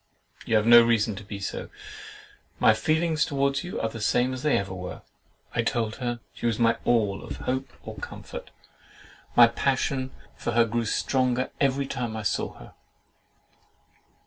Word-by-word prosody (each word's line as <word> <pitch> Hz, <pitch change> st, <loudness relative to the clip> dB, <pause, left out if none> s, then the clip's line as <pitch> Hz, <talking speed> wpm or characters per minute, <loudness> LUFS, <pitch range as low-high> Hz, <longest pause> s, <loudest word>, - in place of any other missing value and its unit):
"You 110 Hz, -, +2 dB
have 105 Hz, 0 st, +3 dB
no 120 Hz, 0 st, +9 dB
reason 115 Hz, -2 st, +2 dB
to 105 Hz, -, -7 dB
be 100 Hz, 0 st, -7 dB
so; 100 Hz, -, -5 dB, 0.9 s
my -, -, +6 dB
feelings 160 Hz, -1 st, +1 dB
towards 140 Hz, +1 st, 0 dB
you 180 Hz, -, -5 dB
are 115 Hz, -, 0 dB
the 115 Hz, 0 st, -7 dB
same 125 Hz, +4 st, +2 dB
as 130 Hz, -, -5 dB
they 150 Hz, 0 st, +3 dB
ever 95 Hz, -1 st, -3 dB
were." 90 Hz, -1 st, -7 dB, 0.5 s
I -, -, +1 dB
told 115 Hz, -2 st, -1 dB
her 120 Hz, -2 st, -3 dB
"She 120 Hz, -, -3 dB
was 115 Hz, -2 st, 0 dB
my 115 Hz, -1 st, +3 dB
all 105 Hz, -5 st, +1 dB
of -, -, -7 dB
hope 130 Hz, +1 st, -2 dB
or -, -, -8 dB
comfort: -, -, -8 dB, 0.9 s
my 120 Hz, -, +10 dB
passion 130 Hz, +2 st, 0 dB, 0.3 s
for 120 Hz, -, -3 dB
her 120 Hz, 0 st, +5 dB
grew 115 Hz, +1 st, -1 dB
stronger 130 Hz, +2 st, 0 dB
every 140 Hz, 0 st, +2 dB
time 120 Hz, -4 st, -4 dB
I 110 Hz, -, -4 dB
saw 105 Hz, -, -1 dB
her." -, -, -13 dB
120 Hz, 170 wpm, -26 LUFS, 110-130 Hz, 0.9 s, my